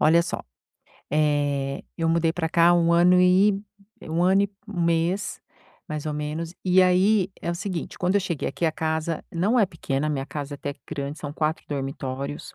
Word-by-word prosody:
Olha 165 +2 +5
só, - - -4 0.7
eh, 145 -2 0 0.2
eu 165 - +1
mudei 165 0 +2
pra 165 -2 -2
cá 170 +1 +4
há - - +6
1 170 -1 +3
ano 180 +1 +5
e 195 +2 +4 0.4
1 165 +2 -1
ano 190 +2 +4
e 200 - -1 0.2
mês, 175 +2 0 0.5
mais 155 0 -4
ou 150 - -1
menos, 155 +3 -4
e 185 0 +5
aí 185 +2 +3
é - - -1
o 170 - -2
seguinte, 185 -2 -5
quando 180 +1 +1
eu 205 - +4
cheguei 175 -6 -2
aqui, - - -3
a 160 - +3
casa 160 0 -2
não 200 +9 +2
é 210 - +5
pequena, 155 -4 -2
minha 135 -3 -2
casa 145 0 -6
é - - -7
até 145 0 -4
que - - -25
grande, 145 0 -4
são 145 -1 -6
4 155 +1 -1
dormitórios 135 0 -4
165 Hz, 195 wpm, -25 LUFS, 150-180 Hz, 0.7 s, há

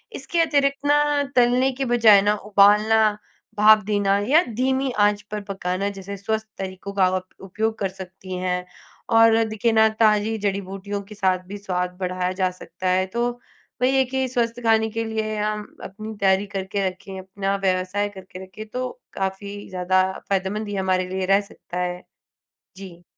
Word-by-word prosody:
इसके 270 +6 -3
अतिरिक्त 280 -3 +1
ना, 295 0 +3
तलने 250 +2 +4
के 270 +1 -3
बजाय 230 -5 +6
ना, 205 +1 +2
उबालना, 210 +1 +4 0.4
भाप 215 +1 +7
देना 200 -1 +2
या 320 +5 +6
धीमी 265 +2 0
आँच 205 0 +3
पर 210 - -3
पकाना 190 +1 -2
जैसे 195 +1 -7
स्वस्थ 220 +2 -2
तरीकों 190 +1 -6
का 195 -2 +3
आप 185 0 -1 0.2
उपयोग 220 +3 -2
कर 195 - 0
सकती 185 0 -9
हैं 180 0 -2 0.5
और 225 0 +6
देखिए 220 +1 0
ना, 220 0 +6
ताज़ी 215 0 +2
जड़ी-बूटियों 200 0 -3
के 210 +2 -12
साथ 190 -2 +1
भी 205 +2 -7
स्वाद 180 -2 -3
बढ़ाया 185 0 -1
जा 185 - +3
सकता 185 0 -5
है। 185 +1 +2
तो 240 +1 +1 0.5
वही 260 +2 +3
है 265 - +5
कि 265 +1 -1
स्वस्थ 240 -1 -1
खाने 220 0 +3
के 230 +1 -2
लिए 220 -1 -3
हम 210 0 -2 0.2
अपनी 215 +3 -8
तैयारी 195 0 +2
करके 195 +1 -1
रखें, 190 +1 -10
अपना 195 +1 -3
व्यवसाय 185 +2 0
करके 185 0 -10
रखें, 190 +3 -10
तो 255 +3 -3 0.2
काफ़ी 200 +1 -5
ज़्यादा 185 0 +2 0.3
फ़ायदेमंद 200 +2 -1
ही 205 - -4
हमारे 185 -1 0
लिए 190 0 -2
रह 195 +1 +4
सकता 180 -3 -9
है। 180 0 -3 0.7
जी। 180 -3 -11
205 Hz, 170 wpm, -23 LUFS, 190-220 Hz, 0.7 s, भाप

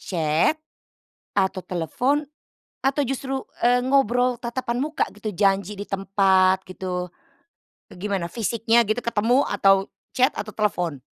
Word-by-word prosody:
chat, 165 - +1 0.8
atau 190 -1 0
telepon 245 - 0 0.6
atau 275 +2 +2
justru, 270 +1 -3 0.2
eee, 245 0 +4
ngobrol 250 -2 +2
tatapan 235 0 -3
muka 305 +2 0
gitu 215 +1 -4
janji 195 +1 +1
di 205 - -5
tempat 190 -1 +3
gitu, 180 -1 -4 0.8
gimana 190 -1 -3
fisiknya 230 +1 +2
gitu 215 +3 0
ketemu 235 +4 +2
atau 195 0 +3 0.3
chat 255 +1 +4
atau 215 - -5
telepon? 180 -8 -1
210 Hz, 120 wpm, -23 LUFS, 190-245 Hz, 0.8 s, eee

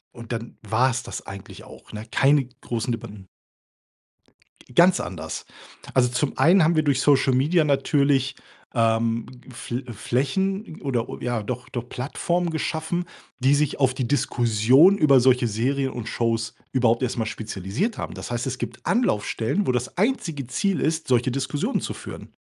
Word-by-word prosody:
Und, 115 -1 -10
dann 115 0 -5
war's 115 +4 +1
das - - -7
eigentlich 100 -1 -10
auch, - - -14
ne? 105 +1 -7
Keine 140 +2 +3 0.2
großen 120 0 -2
Debatten. 105 -4 -7 1.5
Ganz 175 +4 +6
anders. - - -5 0.5
Also, 125 -1 +4
zum 125 +3 -1
einen 175 +2 +5
haben 165 +2 +3
wir 155 - +3
durch 140 -3 +2
Social 135 -2 +4
Media 155 +7 +3
natürlich, 140 -1 +2 0.4
ähm, 115 -1 +1 0.2
F 120 -1 -8 0.2
Flächen 190 - -1
oder 125 -5 -1
o - - -7
ja, 120 -3 -2
doch, 125 +3 -5
doch 120 -1 -5
Plattformen 170 +7 -1
geschaffen, 160 +2 -2 0.3
die 135 +2 +4
sich 150 -1 0
auf 130 -2 +3
die 130 -2 -2
Diskussion 125 - +4
über 140 -7 +6
solche 125 -1 +4
Serien 130 +5 0
und 120 -3 -6
Shows 115 -1 -1 0.2
überhaupt 120 -1 +2
erst 125 - -1
mal 115 - 0
spezialisiert 110 - -3
haben. - - -5
Das - - -7
heißt, 120 +2 -2
es 130 -1 -3
gibt 120 0 -6
Anlaufstellen, 175 - 0
wo - - +4
das 125 +7 -3
einzige 175 - -1
Ziel 190 +9 0
ist, 160 +1 -1
solche 125 -1 +2
Diskussionen 140 - -1
zu - - -4
führen. - - -10
130 Hz, 160 wpm, -24 LUFS, 115-150 Hz, 1.5 s, Ganz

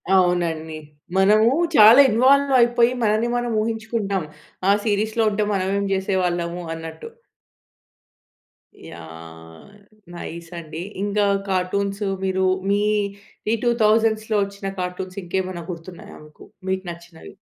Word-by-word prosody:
అవునండి. 170 -3 +1 0.4
మనము 215 +4 +5 0.3
చాలా 220 +4 +8
ఇన్వాల్వ్ 275 +5 +4
అయిపోయి 240 0 +3
మనల్ని 220 +2 +1
మనం 240 0 -2
ఊహించుకుంటాం. 220 -4 -2 0.5
ఆ - - +7
సీరీస్‌లో 215 +2 0
ఉంటే 210 +1 0
మనమేం 195 +1 -1
చేసేవాళ్ళము 180 -2 -1
అన్నట్టు. 160 0 -8 1.8
యాహ్! 80 - -12 0.5
నైస్ 170 -1 -8
అండి. 160 0 -8 0.2
ఇంకా 205 0 +1 0.2
కార్టూన్స్ 195 +2 -1 0.2
మీరు 190 0 0 0.2
మీ 205 +1 +2 0.7
ఈ - - +2
2000స్ 220 -2 +2
ఒచ్చిన 200 0 -7
కార్టూన్స్ 180 +1 -5
ఇంకేమైనా 185 -1 -3
గుర్తున్నాయా 170 +1 -10
మీకు? 150 - -16 0.2
మీకు 190 0 -1
నచ్చినవి. 170 -1 -13
190 Hz, 105 wpm, -22 LUFS, 170-215 Hz, 1.8 s, చాలా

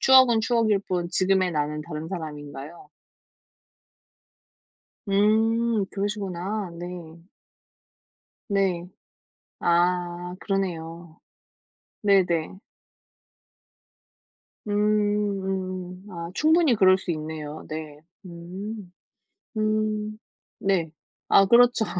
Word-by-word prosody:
추억은 260 -4 +6
추억일 225 -3 +2
뿐 180 -3 -2
지금의 185 -1 +2
나는 150 0 -1
다른 155 0 -6
사람인가요? 150 -3 -7 2.2
음 220 +2 +3
그러시구나. 200 -1 -3
네. 175 -2 -8 1.3
네. 190 -3 0 0.7
아 175 +1 +1
그러네요. 170 -4 -4 0.8
네네. 190 -3 +2 2.1
음음. 195 -3 -1
아 170 -1 -6
충분히 315 -2 +4
그럴 185 -1 +6
수 185 - -5
있네요. 155 -1 -6
네. 155 -1 -7 0.3
음. 180 +3 -8 0.7
음. 215 0 0 0.4
네. 185 -5 +1 0.4
아 195 - +6
그렇죠. 240 +1 +5
185 Hz, 145 characters per minute, -25 LUFS, 170-210 Hz, 2.2 s, 추억은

